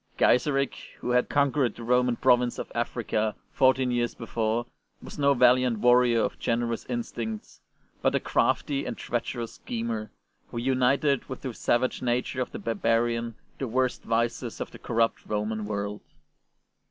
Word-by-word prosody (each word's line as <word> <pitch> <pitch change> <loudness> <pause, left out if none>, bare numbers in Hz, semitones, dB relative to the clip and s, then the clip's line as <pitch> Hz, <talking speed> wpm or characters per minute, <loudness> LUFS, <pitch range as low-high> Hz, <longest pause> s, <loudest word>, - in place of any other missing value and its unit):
Gaiseric, 135 +1 +2 0.2
who 125 - -2
had 125 0 +2
conquered 140 -4 +2
the 120 - -9
Roman 125 +1 +2
province 125 -1 +3
of - - -6
Africa 115 -2 -1 0.2
fourteen 130 -1 +3
years 120 -1 0
before, 115 0 -1 0.3
was - - -10
no 140 -1 +4
valiant 125 -1 +4
warrior 120 0 +4
of - - -2
generous 115 0 -1
instincts, 115 -2 -5 0.4
but - - +2
a - - +3
crafty 140 -1 +1
and - - -4
treacherous 120 -1 -3
schemer, 115 -2 -4 0.4
who - - -7
united 130 +2 +2
with 130 - -6
the 130 -3 -4
savage 120 +3 0
nature 125 +1 -1
of 125 - -3
the - - -6
barbarian 115 0 0 0.2
the 135 - -2
worst 130 +2 0
vices 115 +1 -1
of - - -5
the - - -12
corrupt 115 -1 0
Roman 105 0 -2
world. 105 0 -3
120 Hz, 150 wpm, -27 LUFS, 115-125 Hz, 0.4 s, no